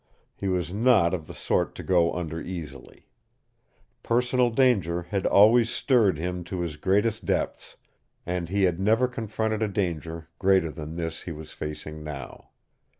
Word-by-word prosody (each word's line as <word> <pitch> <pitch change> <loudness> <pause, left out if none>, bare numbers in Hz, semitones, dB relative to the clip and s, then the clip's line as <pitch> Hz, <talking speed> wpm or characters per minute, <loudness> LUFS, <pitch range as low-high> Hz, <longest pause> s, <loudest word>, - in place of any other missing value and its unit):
He 100 - -4
was 90 -2 -1
not 105 -6 +4
of 80 -4 -3
the - - -8
sort - - 0
to - - -7
go 85 -3 +3
under 80 -2 -4
easily. 75 -7 -8 1.0
Personal 125 +1 +2
danger 105 -9 +2
had 95 +2 -2
always 115 +3 +6
stirred 115 - +2
him 90 +2 -3
to 90 0 -4
his 85 -3 -3
greatest 105 +7 +1
depths, - - -2 0.5
and 90 -1 -3
he 100 +1 +1
had 90 -2 +2
never 110 +6 +3
confronted 110 -2 -2
a 110 - +2
danger 85 -5 -3
greater 95 -4 +3
than 80 0 -7
this 80 -1 -4
he 85 - -7
was 80 -1 -9
facing 75 0 -6
now. 70 -4 -8
90 Hz, 155 wpm, -26 LUFS, 80-110 Hz, 1.0 s, always